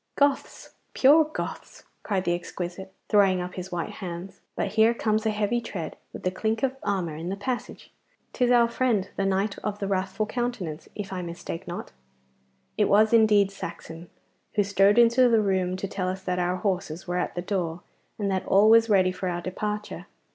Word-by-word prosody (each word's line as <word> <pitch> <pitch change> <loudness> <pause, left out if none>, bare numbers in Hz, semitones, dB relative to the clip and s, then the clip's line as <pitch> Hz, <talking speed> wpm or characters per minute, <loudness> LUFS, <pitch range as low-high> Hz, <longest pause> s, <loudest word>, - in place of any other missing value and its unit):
'Goths! 285 -1 0 0.2
Perfect 305 +3 +5
Goths!' - - -6 0.2
cried 195 -3 -1
the 175 - +1
exquisite, 175 +2 -5 0.2
throwing 195 -3 +4
up 180 0 -5
his 185 0 -7
white 175 -2 -3
hands. 180 +1 -7
'But - - -1
here 220 +2 +4
comes 220 -1 0
a - - +3
heavy 215 +3 0
tread 185 -7 -6 0.2
and - - -9
the 185 - 0
clink 220 +4 -2
of 265 0 +1
armour 185 -6 -2
in 165 +3 -5
the 195 - -2
passage. 245 +5 -5 0.4
'Tis 250 -2 +1
our 240 -1 +5
friend 235 -5 0
the 195 - 0
knight 195 +2 0
of 210 -1 -3
the 200 - -3
wrathful 195 +2 -1
countenance, 215 -10 -4
if 200 -2 -5
I 185 - -3
mistake 170 -1 -6
not.' - - -6 0.9
It 210 - +3
was 215 +2 +4
indeed 210 -3 +5
Saxon, 165 -3 -8 0.5
who 205 - +3
strode 200 +1 +3
into 240 +1 +6
the 230 -1 +4
room 190 -3 0
to 195 - -4
tell 185 -1 -3
us 190 +1 -5
that 180 -1 -1
our 180 +1 0
horses 185 -3 -3
were 180 0 -1
at - - -3
the 175 - -3
door, 175 -3 -2 0.4
and 200 -2 -1
that 190 -1 -2
all 205 +3 +5
was 230 0 +6
ready 185 -3 +4
for 185 0 -3
our 175 0 -3
departure. 210 0 -4
195 Hz, 190 wpm, -26 LUFS, 180-220 Hz, 0.9 s, into